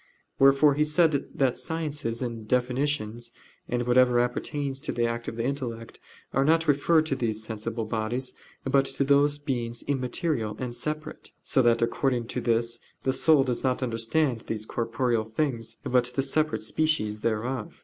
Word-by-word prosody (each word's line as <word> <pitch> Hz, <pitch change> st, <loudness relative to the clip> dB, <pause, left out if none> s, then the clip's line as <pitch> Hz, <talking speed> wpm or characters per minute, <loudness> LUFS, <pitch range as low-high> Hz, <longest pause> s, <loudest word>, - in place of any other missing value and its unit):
Wherefore 135 Hz, +2 st, +6 dB
he 150 Hz, +2 st, +2 dB
said 155 Hz, -1 st, +2 dB
that 130 Hz, -3 st, +1 dB
sciences 145 Hz, -5 st, -3 dB
and 115 Hz, -3 st, -5 dB
definitions, 125 Hz, -2 st, -1 dB, 0.4 s
and 120 Hz, 0 st, -1 dB
whatever 125 Hz, 0 st, +4 dB
appertains 135 Hz, +3 st, -2 dB
to 155 Hz, -, -3 dB
the 120 Hz, 0 st, 0 dB
act 115 Hz, 0 st, -3 dB
of -, -, -4 dB
the 115 Hz, 0 st, -2 dB
intellect, 120 Hz, -4 st, -4 dB, 0.3 s
are 135 Hz, -, +3 dB
not 165 Hz, +2 st, +3 dB
referred 155 Hz, +3 st, +4 dB
to 140 Hz, -, -1 dB
these 110 Hz, -3 st, -2 dB
sensible 110 Hz, +1 st, -4 dB
bodies, 115 Hz, +4 st, -1 dB, 0.3 s
but 135 Hz, +1 st, +3 dB
to 135 Hz, +1 st, -1 dB
those 145 Hz, +1 st, +4 dB
beings 120 Hz, -5 st, -3 dB
immaterial 130 Hz, -, -2 dB
and 125 Hz, -2 st, -4 dB
separate: 155 Hz, +5 st, -5 dB
so 135 Hz, -, +2 dB
that 120 Hz, -1 st, +3 dB
according 120 Hz, 0 st, 0 dB
to -, -, -3 dB
this 115 Hz, 0 st, 0 dB, 0.2 s
the 130 Hz, -, +1 dB
soul 145 Hz, +1 st, +4 dB
does 125 Hz, -3 st, -2 dB
not 130 Hz, 0 st, 0 dB
understand 120 Hz, +2 st, 0 dB
these 110 Hz, -1 st, -2 dB
corporeal 115 Hz, 0 st, 0 dB
things, 115 Hz, -1 st, -3 dB
but 125 Hz, -1 st, +2 dB
the 135 Hz, -, +1 dB
separate 135 Hz, -5 st, 0 dB
species 110 Hz, -5 st, 0 dB
thereof. 115 Hz, +2 st, -2 dB
125 Hz, 160 wpm, -27 LUFS, 115-140 Hz, 0.4 s, Wherefore